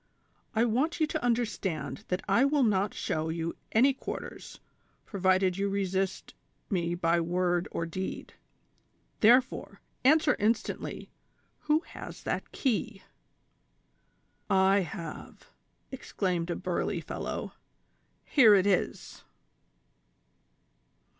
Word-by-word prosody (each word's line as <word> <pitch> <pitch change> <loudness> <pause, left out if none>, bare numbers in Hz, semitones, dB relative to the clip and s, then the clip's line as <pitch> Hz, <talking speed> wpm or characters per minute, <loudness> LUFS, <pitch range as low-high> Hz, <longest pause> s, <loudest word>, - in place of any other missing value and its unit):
I 225 +2 +4
want 265 +10 0
you 315 - +4
to 310 0 -4
understand 195 - -2
that 180 +1 -2
I 200 +6 +4
will 280 0 +3
not 205 -3 +2
show 160 +1 -2
you 165 0 -3 0.2
any 260 +5 +5
quarters, 265 - -7 0.5
provided 185 -1 +1
you 200 0 +1
resist 195 -1 -2 0.4
me 175 -3 0
by 170 0 +2
word 175 +1 0
or 165 - -3
deed; 185 +3 -5 0.9
therefore, 245 +4 +3 0.2
answer 300 +3 +5
instantly, 215 +1 -2 0.5
who 300 +1 +2
has - - -10
that - - -3
key?" 220 -6 -1 0.8
" - - -43
I 195 0 +4
have," 170 -2 -7 0.4
exclaimed 180 -9 -2
a 175 - -1
burly - - -2
fellow; - - -5 0.4
" - - -43
here 230 -8 +8
it 190 -1 +3
is." 200 -3 -1
195 Hz, 110 wpm, -29 LUFS, 180-240 Hz, 0.9 s, here